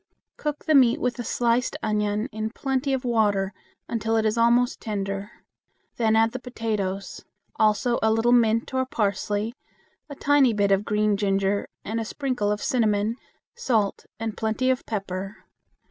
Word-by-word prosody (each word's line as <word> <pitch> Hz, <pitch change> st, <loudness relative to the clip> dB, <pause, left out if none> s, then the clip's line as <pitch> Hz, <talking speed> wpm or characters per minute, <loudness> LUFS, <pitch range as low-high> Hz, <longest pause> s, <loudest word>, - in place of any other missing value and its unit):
Cook 300 Hz, -1 st, -4 dB
the 310 Hz, -, +3 dB
meat 255 Hz, -4 st, +5 dB
with 245 Hz, -1 st, -1 dB
a -, -, -2 dB
sliced 240 Hz, +2 st, 0 dB
onion 210 Hz, +1 st, 0 dB
in 215 Hz, 0 st, -3 dB
plenty 270 Hz, +3 st, -2 dB
of 265 Hz, -1 st, -1 dB
water 205 Hz, -4 st, +1 dB, 0.3 s
until 225 Hz, 0 st, 0 dB
it 220 Hz, -, +1 dB
is 215 Hz, 0 st, +2 dB
almost 240 Hz, +2 st, +3 dB
tender. 200 Hz, -1 st, -3 dB, 0.7 s
Then 220 Hz, -2 st, +2 dB
add 225 Hz, 0 st, +4 dB
the 255 Hz, -, -5 dB
potatoes; 215 Hz, -6 st, -4 dB, 0.3 s
also 220 Hz, +3 st, +2 dB
a 220 Hz, -, +3 dB
little 225 Hz, +2 st, +2 dB
mint 230 Hz, +1 st, +3 dB
or 260 Hz, 0 st, +2 dB
parsley, 210 Hz, -3 st, -1 dB, 0.6 s
a 285 Hz, -, -7 dB
tiny 280 Hz, -4 st, +3 dB
bit 205 Hz, -1 st, +1 dB
of 195 Hz, +1 st, +2 dB
green 210 Hz, -1 st, +1 dB
ginger, 195 Hz, 0 st, 0 dB, 0.2 s
and 225 Hz, +2 st, -2 dB
a 225 Hz, -, -3 dB
sprinkle 245 Hz, -5 st, -1 dB
of 210 Hz, -, -2 dB
cinnamon, 220 Hz, -2 st, +1 dB, 0.4 s
salt 230 Hz, -, -1 dB
and 225 Hz, -2 st, -3 dB
plenty 225 Hz, +4 st, 0 dB
of 255 Hz, -, -3 dB
pepper. 195 Hz, -1 st, -5 dB
220 Hz, 160 wpm, -25 LUFS, 205-245 Hz, 0.7 s, meat